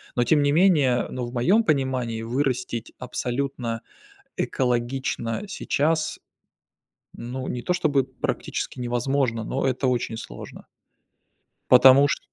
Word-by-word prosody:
Но 120 - +3
тем 150 +1 +3
не 145 - +2
менее, 150 -9 +3
ну, 125 -1 -3
в 120 - -8
моем 185 - +3
понимании, 130 - 0
вырастить 125 -2 -2
абсолютно 125 -2 -3 0.6
экологично 120 - -1
сейчас, 160 -4 0 1.0
ну, 130 +2 -6
не 120 - -3
то 180 - 0
чтобы 145 -7 +1
практически 130 0 -4
невозможно, 120 -1 0
но 135 +4 -1
это 130 +1 0
очень 120 -2 -1
сложно. - - -9 1.1
Потому 130 +3 +8
чт... - - -1
130 Hz, 115 wpm, -24 LUFS, 120-140 Hz, 1.1 s, Потому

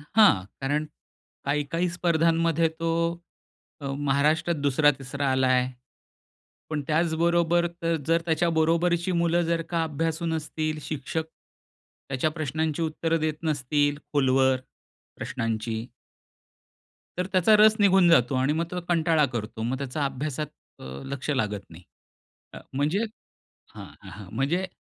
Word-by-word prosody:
हां. 200 - +6 0.2
कारण 145 +3 0 0.6
काही-काही 150 +5 0
स्पर्धांमध्ये 165 -1 +2
तो 165 0 -1 0.9
अ, - - -6
महाराष्ट्रात 150 +4 +1
2रा-3रा 140 -1 +1
आलाय. 130 -1 +3 1.0
पण 150 -2 -2
त्याचबरोबर 170 +2 +2
तर 165 0 +1
जर 165 0 +3
त्याच्या 170 +1 +1
बरोबरची 170 +2 +1
मुलं 170 0 +2
जर 165 0 0
का 165 -2 0
अभ्यासू 160 +2 -2
नसतील 155 -1 -2
शिक्षक, 155 +2 -4 0.8
त्याच्या 135 +4 0
प्रश्नांची 155 +1 -2
उत्तरं 165 +1 0
देत 155 -1 0
नसतील 145 -1 +1 0.2
खोलवर 130 -2 +3 0.6
प्रश्नांची, 115 +1 -3 1.3
तर 180 - 0
त्याचा 190 +3 +5
रस 215 +1 +6
निघून 190 -3 +5
जातो 130 -5 +4
आणि 130 +3 +2
मग 165 +2 -1
तो 180 - -2
कंटाळा 165 -3 +3
करतो. 115 -3 -5
मग 125 +3 -1
त्याचा 140 +2 -3
अभ्यासात 145 +2 -3 0.3
अ, - - -12 0.2
लक्ष 140 +1 -5
लागत 105 -8 0
नाही. 85 +2 -13 0.7
अ, - - -8 0.2
म्हणजे 150 +10 +1 0.7
हां, - - -9 0.2
हां 100 -3 -10
म्हणजे 160 +9 0
155 Hz, 120 wpm, -26 LUFS, 135-170 Hz, 1.3 s, हां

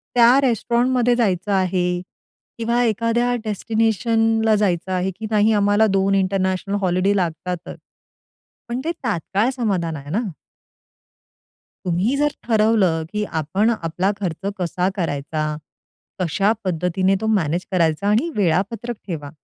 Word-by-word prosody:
त्या 240 +2 +6
रेस्टॉरंटमध्ये 245 0 +2
जायचं 200 -4 0
आहे 180 -2 +1 0.6
किंवा 235 +2 +1
एखाद्या 230 +2 +1
डेस्टिनेशनला 225 +1 +1
जायचं 190 -3 0
आहे, 185 +1 0
की 220 - -6
नाही, 215 0 +3
आम्हाला 205 +1 +3
2 195 0 +2
इंटरनॅशनल 190 0 0
हॉलिडे 185 +2 +1
लागतातच. 180 -1 -3 0.9
पण 240 +2 -2
ते 335 - 0
तात्काळ 195 +8 0
समाधान 180 -9 -1
आहे 145 +1 -9
ना. 210 +7 +1 1.6
तुम्ही 185 +9 +1
जर 295 +1 +2 0.2
ठरवलं, 215 -7 +2
की 210 0 -1 0.2
आपण 195 +9 +1
आपला 185 -1 -1
खर्च 190 +2 -3
कसा 180 +1 0
करायचा, 155 -2 -2 0.8
कशा 195 +5 +2
पद्धतीने 185 +2 +1
तो 220 - -2
मॅनेज 170 0 -1
करायचा 170 +2 +1
आणि 225 +10 +2
वेळापत्रक 205 +6 0
ठेवा. 150 -6 -5
195 Hz, 120 wpm, -21 LUFS, 180-225 Hz, 1.6 s, त्या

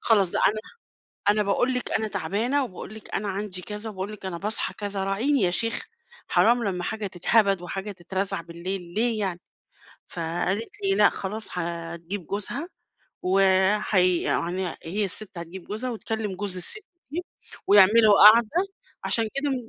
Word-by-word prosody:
خلاص 200 -6 +3
ده - - -1
أنا 215 +1 -2 0.7
أنا 210 0 +2
باقول 245 +6 +1
لِك 250 - -3
أنا 220 0 0
تعبانة 225 - 0
وباقول 205 0 -9
لِك 220 - -10
أنا 205 0 -1
عندي 195 -2 -4
كذا، 210 +3 -6
وباقول 195 +1 -5
لِك 195 -2 -8
أنا 170 -2 -4
باصحى 210 +4 -3
كذا، 200 -2 -3
راعيني 230 +8 +1
يا 180 - +3
شيخة، 230 +5 -1 0.4
حرام 240 +1 +4
لمّا 180 -3 -2
حاجة 215 +1 -3
تتهبد 195 +1 +2
وحاجة 195 +3 -5
تترزع 190 0 -3
بالليل 170 +1 -6
ليه 230 0 +1
يعني!"، 185 -3 -2 0.7
فقالت 175 +6 -2 0.2
لي 390 - +3
لأ، - - +7
خلاص 210 +3 -5
هتجيب 170 +1 -5
جوزها، 240 - -3 0.5
و 185 +2 +2 0.5
هي 180 -3 +4
يعني 180 +2 -1
هي 200 +6 -1
السِّت 195 -1 -6
هتجيب 170 +2 -8
جوزها، 220 +5 -4
وتكلم 220 -3 -3
جوز 195 -1 -3
السِّت 400 - -2 0.3
دي، 345 +4 -3 0.4
ويعملوا 205 +2 +7 0.2
قعدة، 230 -1 +2 0.6
عشان 225 -2 +1
كده 280 +1 0
م - - +1
200 Hz, 160 wpm, -25 LUFS, 180-220 Hz, 0.7 s, لأ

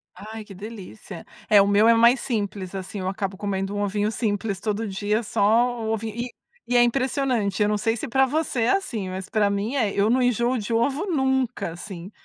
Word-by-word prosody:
Ai, 220 +1 -8
que 210 - -12
delícia. 200 - -9 0.2
É, 205 -1 +7
o 200 - +3
meu 205 +2 +4
é 230 - +7
mais 235 +3 +5
simples, 205 -7 -3
assim, 190 +2 -5
eu 185 - -3
acabo 195 -1 -4
comendo 195 0 -3
um 205 - -1
ovinho 205 +1 0
simples 205 -3 -2
todo 215 +2 -2
dia 205 +3 -1
só 205 - -2 0.4
o 220 0 -1
ovinho 220 0 -3
e 240 +1 -3 0.4
e 245 - +4
é 240 - +7
impressionante. 245 -5 0
Eu - - +2
não 210 0 0
sei 225 +2 0
se 285 - -4
pra 265 +2 +3
você 290 -3 -1
é 225 - +2
assim, 225 - -5
mas 185 0 -5
pra 210 -2 +2
mim 200 +6 -2
é, 225 -7 +1
eu 200 +1 +2
não 250 +3 +3
enjoo 245 0 +2
de 225 -1 -4
ovo 270 - +1
nunca, 265 - 0
assim, 175 +1 -9
215 Hz, 215 wpm, -24 LUFS, 200-240 Hz, 0.4 s, É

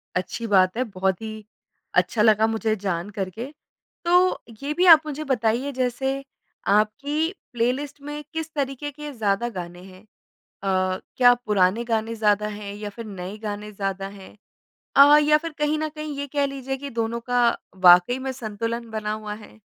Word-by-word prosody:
अच्छी 185 +5 -3
बात 190 -1 +3
है 255 - +2
बहुत 190 0 0
ही 220 -1 -5 0.7
अच्छा 220 - -2
लगा 215 0 +5
मुझे 220 -1 0
जानकर 190 +1 -2
के। 225 +7 -6 0.6
तो 360 +2 +4 0.2
ये 290 +2 -1
भी 360 +4 +2
आप 315 - +9
मुझे 305 0 -4
बताइए 245 +3 +1
जैसे 255 +2 0 0.6
आपकी 285 - 0 0.2
प्लेलिस्ट 260 +5 -1
में 295 0 -5
किस 320 0 -4
तरीके 280 0 -3
के 295 +1 -8
ज़्यादा 220 0 0
गाने 175 0 -7
हैं? 185 0 -14 0.6
अ, 185 -1 0 0.2
क्या 245 -1 +7
पुराने 205 +1 +2
गाने 225 0 -1
ज़्यादा 210 -1 +2
हैं 200 -1 -6
या 210 0 -6
फिर 230 - -6
नए 195 0 -7
गाने 210 0 -5
ज़्यादा 195 -1 -3
हैं? 190 +2 -14 0.6
अ, 290 +2 +9
या 300 0 +4
फिर 330 +1 -6
कहीं 300 +1 +1
ना 310 0 -1
कहीं 305 -1 -6
ये 285 - -3
कह 285 - +3
लीजिए 270 -1 -4
कि 280 - -4
दोनों 230 +1 -2
का 245 -1 +4 0.4
वाक़ई 180 +9 +7
में - - -1
संतुलन 230 0 -4
बना 215 -1 -3
हुआ 215 -1 -5
है? 215 +1 -14
230 Hz, 170 wpm, -24 LUFS, 205-280 Hz, 0.7 s, आप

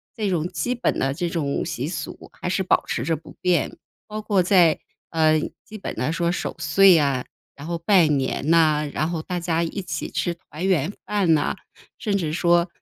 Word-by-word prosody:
这 215 -3 -1
种 175 -2 0
基 180 +9 -2
本 240 - 0
的 135 0 +1
这 175 +4 -2
种 155 -5 -1
习 155 -5 -3
俗 175 - -6
还 - - -6
是 190 - 0
保 185 - +2
持 - - -2
着 165 - 0
不 155 - -12
变。 175 -4 +1 0.3
包 215 0 -5
括 205 -3 +2
在， 175 -4 +4 0.3
呃， 155 -1 +3 0.3
基 215 - -9
本 195 - -5
来 125 +7 -1
说 170 +1 0
守 - - -3
岁 190 +5 +6
呀， 140 -5 +2 0.3
然 145 +2 -9
后 170 0 -2
拜 170 -1 +4
年 140 +1 0
呐， 155 -3 +4
然 155 - 0
后 165 -2 -2
大 180 +2 -3
家 170 -1 0
一 170 +4 -3
起 155 -3 -4
吃 175 - -1
团 165 0 -8
圆 175 -3 +2
饭 195 -6 +2
呐， 145 - 0 0.4
甚 205 -3 0
至 160 -5 -2
说， 175 0 +3
170 Hz, 215 characters per minute, -23 LUFS, 155-185 Hz, 0.4 s, 岁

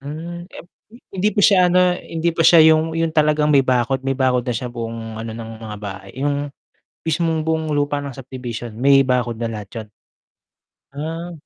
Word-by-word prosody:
Hmm, 170 +5 -7
ep - - -11 0.5
hindi 195 +2 +1
pa 205 - +1
siya 185 -3 +5
ano 180 0 +4
hindi 165 +1 -2
pa - - -1
siya 170 -2 +8
'yung 160 +1 0
'yung 165 -1 0
talagang 150 -1 +2
may 135 -2 +5
bakod. 130 +1 +1
May 135 0 -1
bakod 130 -2 +1
na 125 - -1
siya 125 - -4
buong 115 -1 -6
ano 115 0 -5
ng 115 -1 -7
mga 105 -1 -6
bahay, 95 -1 -8
'yung 145 0 -1 0.6
mismong 160 0 0
buong 160 -1 -1
lupa 145 0 0
ng 140 -2 -6
subdivision, 120 -3 -7
may 135 +1 +5
bakod 125 -3 0
na 115 -1 -2
lahat 105 -3 -7
'yun? 110 - -17 1.1
Ah. 165 +4 -5
140 Hz, 185 wpm, -20 LUFS, 120-160 Hz, 1.1 s, siya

